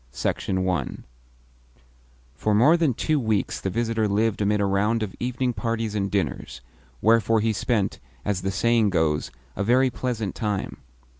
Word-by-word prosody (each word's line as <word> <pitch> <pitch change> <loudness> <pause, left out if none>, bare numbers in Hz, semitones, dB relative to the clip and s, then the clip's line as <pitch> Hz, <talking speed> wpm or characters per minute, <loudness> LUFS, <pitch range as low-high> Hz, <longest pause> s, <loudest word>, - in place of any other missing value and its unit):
CHAPTER 65 - -2
II 90 -7 -1 1.3
For 105 +9 0
more 140 +10 +6
than 160 -8 +1
two 155 +3 +1
weeks 110 -5 -1
the 95 - -1
visitor 115 +1 0
lived 105 +1 +1
amid 105 +1 +2
a 100 - +2
round 105 +4 +1
of 100 - -5
evening 125 0 -1
parties 115 -2 -2
and 100 -2 -1
dinners; 95 -10 -3 0.4
wherefore 115 0 +4
he 110 +1 +1
spent 105 -2 -1 0.3
(as 100 -3 -1
the 95 - -1
saying 115 +2 +2
goes) 80 -4 0 0.3
a 100 - -1
very 125 +4 +3
pleasant 115 -5 -3
time. 105 -3 -3
110 Hz, 155 wpm, -24 LUFS, 100-115 Hz, 1.3 s, more